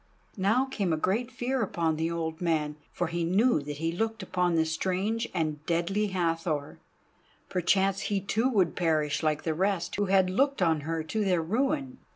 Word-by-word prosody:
Now 220 +7 +2
a - - +3
great 215 +9 0
fear 255 +1 -2
came - - +2
upon 165 -5 0
the 160 +1 -1
old 165 -1 -3
man, 155 -3 0 0.2
for 175 - -1
he 170 0 -2
knew 190 - +3
that 145 0 -6
he 165 +2 -1
looked 225 +3 -2
upon 180 -2 0
the 160 0 +3
strange 190 +8 -1
and 155 -4 -2
deadly 175 +5 +1
Hathor. 165 -5 -2 0.7
Perchance 190 +2 +2
he 200 -1 +1
too 220 +6 0
would 195 -9 +2
perish 155 -4 +1
like 155 -2 0
the 160 - 0
rest 185 0 -1
who 205 - +1
had 190 -1 +4
looked 275 +7 +2
on 165 -4 +3
her 160 +2 -2
to 210 +7 -1
their 180 -4 +2
ruin. 265 - -1
180 Hz, 185 wpm, -28 LUFS, 160-210 Hz, 0.7 s, had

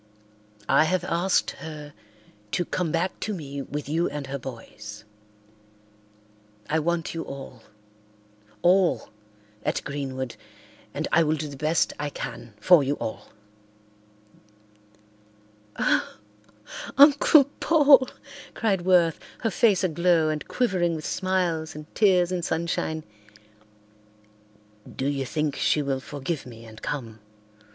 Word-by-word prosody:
I 155 - +5
have 180 +1 0
asked 180 +1 +1
her 150 -2 -8 0.6
to 175 - +1
come 175 -2 -2
back 170 +3 -1
to 215 - -3
me 140 -4 -6
with 145 +1 -5
you 165 +4 0
and 145 0 -5
her 140 +1 -5
boys. 105 -4 -9 1.6
I 160 - +1
want 170 +1 -1
you 165 - -3
all—all—at 105 - -4
Greenwood 130 -3 -4 0.6
and - - -2
I - - +5
will 155 -1 +2
do 155 0 -4
the 140 - -8
best 155 +4 +1
I 145 0 -2
can 120 -6 -7
for 175 +7 +6
you 140 +2 0
all." 110 - -6 2.5
"Oh, - - +1 0.8
Uncle 285 +1 +7 0.2
Paul," 290 -5 +6 0.5
cried 200 -5 +1
Worth, 175 -3 +3 0.2
her 225 - 0
face 195 +1 +3
aglow 170 -2 +2
and 155 -1 -3
quivering 185 -9 +1
with 155 - -6
smiles 180 -5 -1
and 150 0 -8
tears 185 -4 +3
and 180 -2 -2
sunshine. 160 -1 -2 1.9
"Do 130 - -3
you 135 -2 -1
think 150 -1 -1
she 150 - +2
will 135 -1 -1
forgive 145 +2 -5
me 115 -1 -11
and 110 0 -13
come?" 115 -6 -5
155 Hz, 120 wpm, -25 LUFS, 130-175 Hz, 2.5 s, Uncle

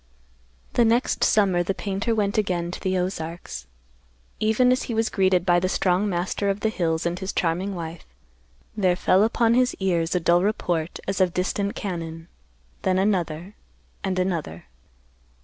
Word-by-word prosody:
The 240 - +4
next 235 +2 +2
summer 195 -4 +3
the 190 +2 -1
painter 200 +3 -1
went 205 -2 0
again 175 -4 -1
to - - -6
the 185 0 -1
Ozarks. 165 - -4 0.7
Even 220 +4 +3
as 255 - +2
he 230 - -1
was 225 0 +1
greeted 185 -3 +2
by 175 -1 +4
the 185 +1 -1
strong 185 +2 +1
master 185 +2 -1
of 200 +1 -1
the 220 - +2
hills 165 -6 -1
and 175 +1 -1
his 190 0 -3
charming 180 +4 -1
wife, 165 -1 -7 0.7
there 185 -4 +2
fell 185 +2 +3
upon 230 +1 +2
his 250 +1 +2
ears 175 -3 0
a - - +3
dull 175 +1 +3
report 175 -5 -1
as 195 0 0
of 180 -2 +2
distant 200 +2 -1
cannon; 165 -4 -5 0.5
then 185 0 +1
another, 185 -2 0 0.5
and 190 -2 -1
another. 170 - -2
185 Hz, 165 wpm, -24 LUFS, 175-205 Hz, 0.7 s, The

